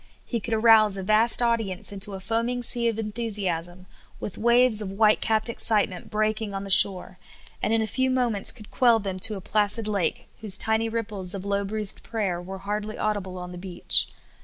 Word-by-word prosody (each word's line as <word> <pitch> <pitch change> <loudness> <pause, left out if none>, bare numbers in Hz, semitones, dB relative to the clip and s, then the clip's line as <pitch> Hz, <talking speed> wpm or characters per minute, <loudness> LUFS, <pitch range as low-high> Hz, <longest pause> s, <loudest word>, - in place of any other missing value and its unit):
He 235 - -3
could 225 +1 -3
arouse 220 -2 +4
a 190 - -5
vast 220 +5 +4
audience 225 -7 -1
into 200 0 -3
a - - -7
foaming 230 +5 -2
sea 235 0 +3
of 225 -2 -1
enthusiasm, 195 -6 -3 0.3
with 200 - -6
waves 235 -1 +4
of 205 - -5
white 215 +1 +3
capped 220 0 0
excitement 210 -5 0
breaking 215 -1 -2
on 195 - -4
the 195 - -7
shore, 185 -1 +2 0.4
and - - -1
in 225 0 +2
a - - -1
few 260 +5 -1
moments 245 -6 +1
could 215 -3 -13
quell 240 -3 +4
them 195 -3 -5
to 210 +3 +3
a 195 - -7
placid 210 +3 +1
lake, 200 -5 -2
whose 210 -4 +3
tiny 220 +1 +1
ripples 205 -5 -3
of 190 - -6
low^ 200 0 -2
breathed 210 -1 -6
prayer 195 -6 -3
were 190 +2 -8
hardly 210 +2 -5
audible 200 -3 -3
on 180 0 -8
the 180 - -9
beach. 180 -1 +1
210 Hz, 195 wpm, -24 LUFS, 195-225 Hz, 0.4 s, arouse